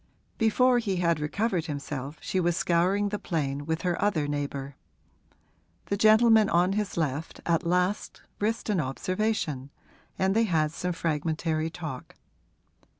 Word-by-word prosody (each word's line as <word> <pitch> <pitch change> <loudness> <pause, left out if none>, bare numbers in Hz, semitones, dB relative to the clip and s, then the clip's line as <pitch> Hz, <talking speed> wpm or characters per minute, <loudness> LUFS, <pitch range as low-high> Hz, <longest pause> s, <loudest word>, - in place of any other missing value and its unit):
Before 245 +2 +4
he 205 -5 -1
had 170 -3 +1
recovered 175 +3 -1
himself 145 -1 -5
she 190 - -1
was 175 -1 +1
scouring 185 +5 +2
the 210 0 -3
plain 145 -4 -2
with 160 0 -2
her 180 -2 0
other 160 -8 +1
neighbour. 140 -1 -4 1.1
The 200 - -1
gentleman 220 +1 +5
on 180 +3 +3
his 210 -3 -2
left 155 0 -2
at 170 0 +1
last 180 +3 0 0.2
risked 220 +1 -1
an 195 - +1
observation, 155 -1 -2 0.5
and 190 +1 +1
they 225 0 +4
had 155 -6 +1
some 180 +2 -3
fragmentary 160 0 -1
talk. 155 -6 -7
170 Hz, 140 wpm, -27 LUFS, 155-205 Hz, 1.1 s, gentleman